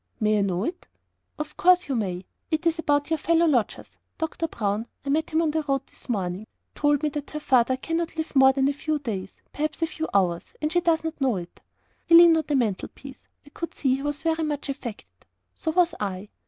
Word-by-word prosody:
"May 215 -1 +2
I - - +2
know 190 -1 0
it?" 345 +8 -5 0.5
"Of 300 0 -5
course 365 +1 +4
you 275 - -1
may. 185 -5 -2 0.2
It 320 0 -1
is 335 0 +2
about 290 -1 +1
our 320 - +1
fellow 335 +3 +3
lodgers. 255 -9 -1 0.2
Doctor 320 +1 -2
Brown 215 -3 -2 0.2
I - - -3
met 315 +3 +1
him 320 +1 +2
on 310 - +1
the 315 +1 0
road 275 -2 -1
this - - -15
morning 195 -2 -2 0.3
told 290 0 +1
me 305 - +2
that 290 0 -6
her 300 - -5
father 255 -3 +3
cannot 330 +3 -3
live 320 -1 -4
more 265 0 +7
than 265 0 +1
a 285 - +1
few 305 +2 -2
days 205 -9 -6
perhaps 310 +2 -2
a - - +5
few 320 0 -5
hours. 180 -4 0
And 305 0 -1
she 350 0 +2
does 330 -2 +2
not 320 -2 -5
know 260 -4 +2
it." 175 -2 -8 0.5
He 335 - +7
leaned 340 -1 +9
on 320 - 0
the 295 - +1
mantelpiece. 250 +3 -3 0.2
I - - -15
could 335 - -6
see 265 -3 +1
he - - -7
was 290 +1 -3
very 325 -1 +1
much 295 -2 -3
affected. 255 -6 -8 0.3
So 320 - -4
was 345 +1 +3
I. 200 0 -4
290 Hz, 225 wpm, -25 LUFS, 235-320 Hz, 0.5 s, leaned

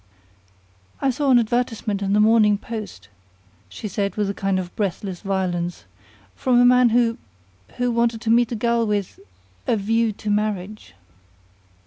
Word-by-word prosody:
"I 270 - +1
saw 280 +2 -1
an 255 - +6
advertisement 225 -3 -1
in 200 0 0
the 210 - +3
Morning 215 -1 +4
Post," 215 - -8 0.6
she 95 - -7
said 200 0 -2
with 205 -2 0
a - - -6
kind 195 -1 -1
of 180 -1 -5
breathless 195 -2 -3
violence, 180 - -2 0.5
"from 250 -2 +2
a 245 - +6
man 250 0 +5
who 230 0 +1 0.6
who 245 0 0
wanted 235 -1 +1
to 225 -2 0
meet 240 +1 +3
a - - -1
girl 235 +1 +1
with 205 -3 -2 0.5
a 225 - +2
'view 225 +2 +1
to 210 +1 -4
marriage.'" 210 - -3
215 Hz, 155 wpm, -22 LUFS, 200-235 Hz, 0.6 s, an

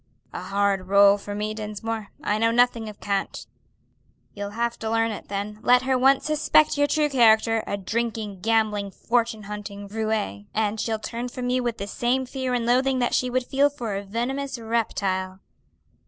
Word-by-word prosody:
"A - - -5
hard 195 -1 0
rôle 200 +1 +6
for 205 0 -6
me, 210 +1 -2
Dinsmore. 215 0 -5 0.2
I 210 +1 0
know 230 +1 +3
nothing 235 -1 +2
of 210 - -12
cant." 200 -1 -2 0.9
"You'll 205 0 -5
have 235 0 -1
to 220 - -3
learn 225 0 +1
it 210 - -7
then; 205 +1 -4
let 250 +1 +4
her 260 0 +1
once 265 +2 +4
suspect 305 0 +3
your 290 0 +2
true 300 0 +2
character 225 -4 +4
a 200 - -2
drinking, 215 -1 -3
gambling, 215 -1 +1
fortune 225 +1 -1
hunting 205 0 -7
roué 215 - -2
and 215 0 0
she'll 225 -1 -1
turn 235 +3 -5
from 250 0 -3
you 255 0 +1
with 240 -2 -2
the 200 - -4
same 245 +5 0
fear 255 -1 -2
and 235 -1 -1
loathing 260 +2 +2
that 245 -1 0
she 255 - +1
would 255 0 0
feel 280 +3 +3
for 240 -8 -5
a 200 - -2
venomous 245 +6 -3
reptile." 195 -5 -2
225 Hz, 185 wpm, -24 LUFS, 205-245 Hz, 0.9 s, rôle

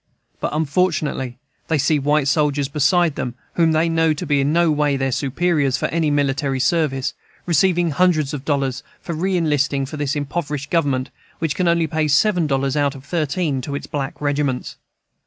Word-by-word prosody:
But, - - -1
unfortunately, 155 -5 0 0.3
they 160 - +1
see 150 +2 +2
white 145 0 +1
soldiers 145 -1 +1
beside 155 +4 +2
them, 125 -3 -4 0.2
whom 165 -2 +3
they 160 +1 +2
know 165 -1 +2
to 150 - -5
be 145 -2 +2
in 140 +2 +1
no 170 0 +3
way 145 -2 +1
their 135 0 -1
superiors 140 0 +1
for - - -2
any 165 -2 +1
military 140 -1 0
service, 135 -1 0 0.3
receiving 175 0 +2
hundreds 155 -3 +2
of 140 -2 -5
dollars 135 -4 -1 0.2
for 170 - -5
re 185 +4 0
enlisting 145 -4 +1
for 150 +3 -7
this 145 +1 -1
impoverished 145 -1 -3
Government, 140 -6 0 0.3
which 160 -2 -1
can 180 +2 0
only 170 -1 +3
pay 155 0 -1
seven 170 +3 +3
dollars 135 0 0
out 145 -1 +1
of 135 0 -12
thirteen 155 -3 -1
to 140 +2 -5
its - - -5
black 140 -3 -4
regiments. 145 -3 -1
150 Hz, 180 wpm, -20 LUFS, 140-165 Hz, 0.3 s, whom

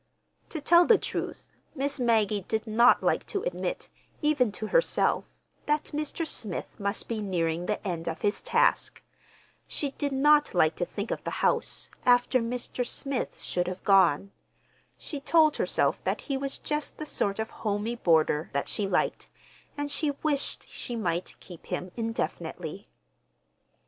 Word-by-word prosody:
To 320 - -4
tell 340 +4 +6
the 450 - +7
truth, - - -5 0.2
Miss 280 0 -1
Maggie 220 -4 +2
did 220 0 -1
not 235 +3 +5
like - - +2
to 400 0 -2
admit, - - -3 0.4
even 285 -7 +3
to 215 - -4
herself, - - +2 0.4
that 295 0 0
Mr. 305 +2 -2
Smith 215 - -4
must 200 0 -2
be 225 -2 -2
nearing 175 -3 -1
the 210 0 -2
end 170 -2 -3
of 165 0 -3
his 205 +1 0
task. - - +1 0.6
She 285 -2 -2
did 285 0 -2
not 295 -1 +4
like 160 -2 +4
to 175 - 0
think 205 +3 -5
of - - -3
the - - -2 0.2
house—after 245 +1 +2
Mr. 245 +1 -2
Smith 275 +1 -3
should 180 0 -1
have 185 0 -5
gone. 195 -2 +4 0.7
She 290 - -5
told 310 +1 +4
herself - - +1
that - - -1
he 275 - -3
was 275 0 -2
just 300 0 -3
the 305 - -5
sort 200 -8 0
of 220 0 -3
homey 210 +2 -1
boarder 160 -6 +2
that 140 - -1
she 205 - -1
liked, - - 0 0.5
and 290 0 -2
she 305 0 0
wished 290 -3 -1
she 240 - -6
might 175 -5 -2
keep 175 -3 -13
him 180 0 -4
indefinitely. 230 0 -4
230 Hz, 155 wpm, -28 LUFS, 195-290 Hz, 0.7 s, the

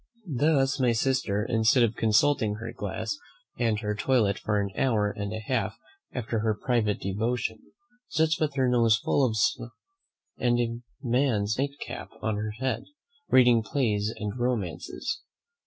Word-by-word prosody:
Thus, 135 0 +2
my 125 -2 +3
sister, 115 -4 0
instead 115 +2 +4
of 115 -2 +2
consulting 110 0 +3
her 115 +1 -6
glass 100 0 -4 0.4
and 115 -3 +1
her 105 -1 -1
toilet 110 -2 +1
for 105 -1 0
an 100 -1 -2
hour 105 -5 +2
and 100 -1 -4
a 110 - -3
half 115 -3 -1 0.3
after 115 -2 -2
her 110 0 +1
private 115 -5 +1
devotion, 110 +3 -1 0.5
sits 160 +1 +1
with 150 -3 0
her 130 -2 +2
nose 115 -3 +4
full 140 - +1
of 115 -4 +1
snuff 115 +2 0 0.7
and 120 -1 +2
a 115 -1 -1 0.2
man's 120 -4 +1
nightcap 140 +1 -4
on 110 -2 -1
her 110 +1 -2
head, 130 -1 -1 0.4
reading 120 -2 +6
plays 110 -4 0
and 105 +3 -4
romances. 120 - -2
115 Hz, 150 wpm, -27 LUFS, 105-130 Hz, 0.7 s, reading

